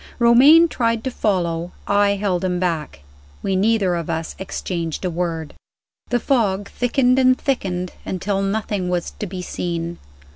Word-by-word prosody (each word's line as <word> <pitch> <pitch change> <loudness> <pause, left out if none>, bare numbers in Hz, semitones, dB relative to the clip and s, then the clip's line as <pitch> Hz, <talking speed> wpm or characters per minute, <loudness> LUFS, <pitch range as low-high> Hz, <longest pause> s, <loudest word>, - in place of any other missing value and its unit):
Romayne 270 +8 +7
tried 230 -6 0
to 260 - -2
follow; 175 -6 -1
I 200 0 +3
held 195 -3 -1
him 180 -1 0
back 160 - -2 0.4
we 195 - 0
neither 200 -1 +2
of 170 -2 -3
us 160 0 -3
exchanged 175 -3 -4
a 180 - 0
word. 165 -2 -3 0.6
The 245 - +1
fog 205 -7 0
thickened 250 +1 +2
and 255 0 +4
thickened, 185 -10 -2
until 195 +1 -2
nothing 200 -2 -1
was 175 -1 -2
to 210 - -6
be 180 0 -6
seen. 170 -1 -4
190 Hz, 150 wpm, -21 LUFS, 175-230 Hz, 0.6 s, Romayne